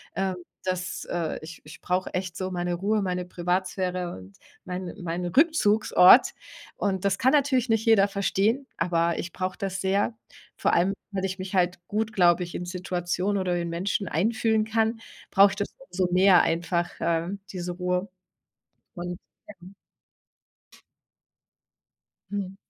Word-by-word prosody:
Ähm, 190 -1 -1 0.3
das, 185 0 -3
äh, 170 -3 -2
ich 160 +1 -10
ich 150 - -12
brauche 180 +1 -1
echt 185 -1 -3
so 185 0 -3
meine 175 -1 -2
Ruhe, 205 +4 0
meine 180 -1 -2
Privatsphäre 180 0 -2
und 95 +1 -14 0.3
mein 180 -1 -5
mein 175 +1 -3
Rückzugsort! 220 - +5 0.5
Und 190 -2 -1
das 195 0 +2
kann 260 +4 +3
natürlich 265 -4 +2
nicht 225 0 +1
jeder 215 -3 +5
verstehen, 200 +6 0
aber 170 0 +1
ich 180 - -5
brauche 185 0 -3
das 195 0 -3
sehr. 200 +4 0 0.4
Vor - - +1
allem, 180 +3 +3 0.2
weil 195 -1 -2
ich 190 0 -3
mich 185 +1 -6
halt 180 -1 +1
gut, 220 +1 -2
glaube 180 -2 +4
ich, 175 - -8
in 180 - -4
Situationen 180 +2 -2
oder 180 -2 0
in 170 -1 -2
Menschen 185 +3 -2
einfühlen 220 +6 +1
kann, 225 +1 0 0.3
brauche 200 +1 +7
ich - - -5
das 205 - -4
umso 185 -9 -2
mehr 185 0 +6
einfach, 170 +1 -1
äh, 165 0 0 0.2
diese 180 -1 -4
Ruhe. 180 +1 -1 0.9
Und, 175 0 -5 0.4
ähm 185 +3 -13 2.6
Mhm. 195 -2 -4
185 Hz, 150 wpm, -26 LUFS, 175-200 Hz, 2.6 s, brauche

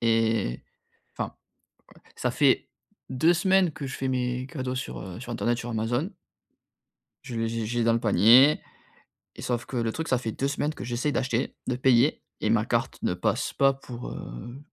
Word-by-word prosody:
Et, 115 - +1 0.5
enfin, - - -3 0.6
ouais, - - -20
ça - - -1
fait - - +3 0.4
2 160 +7 +3
semaines 185 0 +3
que 145 - -6
je 135 - -5
fais 135 - -2
mes 125 0 -1
cadeaux 130 -4 -4
sur, 130 - -4
heu, 90 0 -8
sur 120 0 -7
internet, 120 0 0
sur 120 0 -5
Amazon. 120 - -1 1.2
Je 120 - -7
les 115 0 0
j'ai 115 0 -2
j'ai 120 +1 0
dans 115 - +4
le 115 - +1
panier. 120 - +6 0.7
Et, - - -10
sauf 120 -1 -1
que 130 - -6
le 115 -1 0
truc, 160 +5 -4
ça 130 - +3
fait 115 -3 -4
2 135 - -1
semaines 145 +1 -1
que - - -7
j'essaie 125 +5 -1
d'acheter, 130 -3 -1
de 125 - 0
payer 130 +2 +3 0.2
et - - 0
ma - - +3
carte - - -1
ne - - +1
passe - - -1
pas 135 0 +4
pour, 125 -2 -8
heu, 120 - -8
125 Hz, 190 wpm, -27 LUFS, 115-135 Hz, 1.2 s, panier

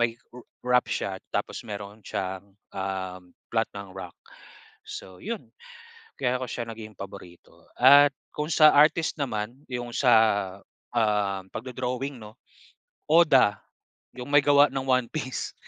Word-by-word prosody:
may 115 -1 +1 0.2
r 125 - -10 0.2
rap 125 0 +3
siya 95 -1 -3
tapos - - -2
mayroon 100 +1 -7
siyang, 95 +1 -5 0.2
ah, 95 -1 -4 0.3
plot 115 -1 +1
ng 100 -2 -8
rock. 95 -2 -9 0.7
So 95 -1 -9
'yon, 210 - -6 0.7
kaya 125 -1 0
ko 130 - -4
siya 120 - -4
naging 110 -2 -9
paborito. 95 -3 -12
At 140 +3 +7 0.2
kung 150 +1 -3
sa 155 -2 +6
artist 155 +2 +3
naman 120 -1 -3
'yong 120 -1 -5
sa, 125 -3 +4 0.8
um, 105 -4 +1
pagdo-drawing, 130 +2 -4
'no, 110 +2 -12 0.7
Oda, 145 -10 +5 0.6
'yong 125 +3 -7
may 145 0 +6
gawa 145 0 +6
ng 135 -1 -2
One 130 -1 +3
Piece, 130 -4 -4
120 Hz, 135 wpm, -26 LUFS, 100-135 Hz, 0.8 s, At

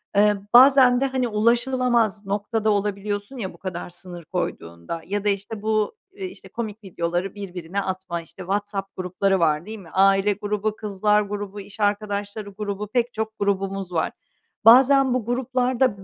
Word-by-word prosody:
Eee, 210 0 +5 0.2
bazen 255 0 +7
de, - - +3
hani, 260 -2 0
ulaşılamaz 235 -1 +1
noktada 210 +2 -1
olabiliyorsun 205 +3 -2
ya, 190 -5 -4
bu - - -16
kadar 180 -2 -5
sınır 175 -1 -8
koyduğunda 85 - -4
ya 205 +2 -2
da - - +4
işte 205 +2 -3
bu, 215 - 0 0.2
iii, 385 -1 -5
işte, - - -12
komik 220 -2 -6
videoları 175 +1 -2
birbirine 185 -1 -4
atma, 185 -3 -4
işte, 165 - -14
WhatsApp 195 +1 -3
grupları 185 +1 0
var, 155 0 +2
değil 220 0 -7
mi? 175 -4 -13
Aile 195 +1 +4
grubu, 210 +1 -2
kızlar 210 0 +1
grubu, 205 0 -5
iş 205 +2 -13
arkadaşları 205 0 -1
grubu, 210 -1 -3
pek 240 +2 0
çok 220 0 -4
grubumuz 195 -1 -1
var. 165 -2 0 0.5
Bazen 265 +2 +7
bu 250 -4 -1
gruplar 250 +1 -1
da, 215 -7 +2
205 Hz, 160 wpm, -23 LUFS, 195-225 Hz, 0.5 s, bazen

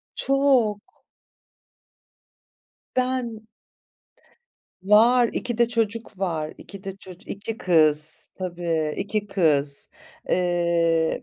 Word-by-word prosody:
Çok. 270 -6 +2 2.2
Ben 250 -4 -2 1.4
Var, 230 +4 +5
2 240 -2 -3
de 235 -1 +4
çocuk 225 -3 -2
var, 160 -5 -2
2 200 -1 -12
de 195 0 -6
çocu 190 +1 -13
2 210 +3 -5
kız 155 -3 +3
tabii, 170 -4 -2
2 205 +1 -2
kız. 150 -7 +1 0.4
Eee, 170 -2 +1
195 Hz, 85 wpm, -24 LUFS, 170-225 Hz, 2.2 s, Var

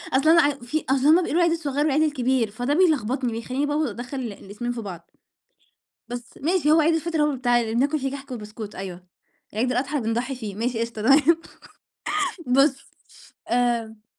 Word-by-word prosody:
أصل 310 +5 +5
ع 290 - +5
وفي 275 +5 -3
أصل 270 +1 +2
هُم 310 - +8
بيقولوا - - -3
العيد 340 -1 +3
الصغيّر 290 -4 -3
والعيد 305 +1 +2
الكبير 260 -6 +1
فده 245 +7 -1
بيلخبطني 265 - +2
بيخلّيني 255 +5 -2
بقى 295 0 -1
و 310 - +1
أدخّل 245 +5 -6
ال 235 -4 -4
الاسمين 210 +5 -6
في 235 - -5
بعض. 180 -5 -8 1.0
بس 240 -1 -8
ماشي 315 0 +1
هو 320 +1 +6
عيد 325 +2 +3
الفطر 325 -1 0
هو - - +4
اللي 280 -4 -2
بتاع 240 -1 +3
اللي 225 -1 -3
بناكل 285 +5 +2
فيه 270 0 -2
كحك 280 0 -8
وبسكوت 215 -2 -7
أيوه، 185 -1 -7 0.5
عيد 245 +4 0
الأضحى 275 +4 -1
بنضحّي 235 +4 -2
فيه 215 -5 -6
ماشي 230 +2 -2
قشطة 230 -2 -4
تمام 295 +6 +5 1.1
بُص 275 +2 +2 0.6
آمم 230 -3 0
255 Hz, 180 wpm, -24 LUFS, 230-295 Hz, 1.1 s, هُم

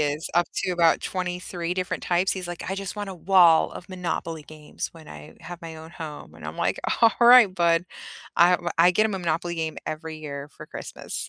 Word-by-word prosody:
is 150 +1 -1
up 175 -1 +3 0.2
to 185 - -1
about 170 -2 +3
23 180 -1 -3
different 185 -1 -3
types. 180 +2 +1
He's 185 -2 -5
like, 175 -1 -6
"I 195 - -2
just 195 -1 -5
want 205 -2 -5
a - - -7
wall 175 -2 +5
of 180 - -10
Monopoly 170 -4 -4
games 155 -1 -7
when 160 -2 -14
I 75 0 -11
have 175 -1 -9
my 165 -1 -8
own 160 +1 -11
home." 155 -3 -9
And - - -9
I'm - - -7
like, - - 0 0.2
"Alright, 235 -2 +7
bud." 170 0 +2 0.5
I 175 +1 +6
w 175 -1 0
I 175 +2 +6
get 215 +4 +3
him 215 - 0
a 190 - -2
Monopoly 170 0 -2
game 160 -1 -3
every 160 0 -5
year 140 -2 -6
for - - -12
Christmas. - - -7
175 Hz, 215 wpm, -25 LUFS, 160-185 Hz, 0.5 s, Alright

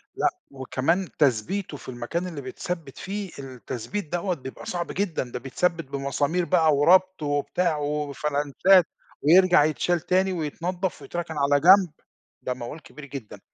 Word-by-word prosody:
لأ، - - +2 0.2
وكمان 140 +7 -1
تثبيتُه 145 - +1
في - - -11
المكان 130 +9 -3
اللي 160 -5 -6
بيتثبّت 160 +2 -6
فيه، 200 +1 -5
التثبيت 135 - -6
دوّة 175 +1 0
بيبقى 130 -2 -9
صعب 175 -1 -3
جدًا، 190 -7 -1
ده 125 - -4
بيتثبّت 165 +6 -1
بمسامير 140 +5 -1
بقى 160 -4 +3
وربط 185 +4 +4
وبتاع 145 +3 0
وفلانشات، 150 +4 +2 0.4
ويرجَع 175 +1 +6
يتشال 165 +3 +1
تاني 185 +3 +1
ويتنضّف 175 +2 -3
ويتركن 165 +3 -5
على 145 0 +3
جنب، 185 +2 +7 0.5
ده 125 - -2
موال 125 +5 -8
كبير 150 -1 -12
جدًا. 135 -6 -9
155 Hz, 135 wpm, -25 LUFS, 140-180 Hz, 0.5 s, جنب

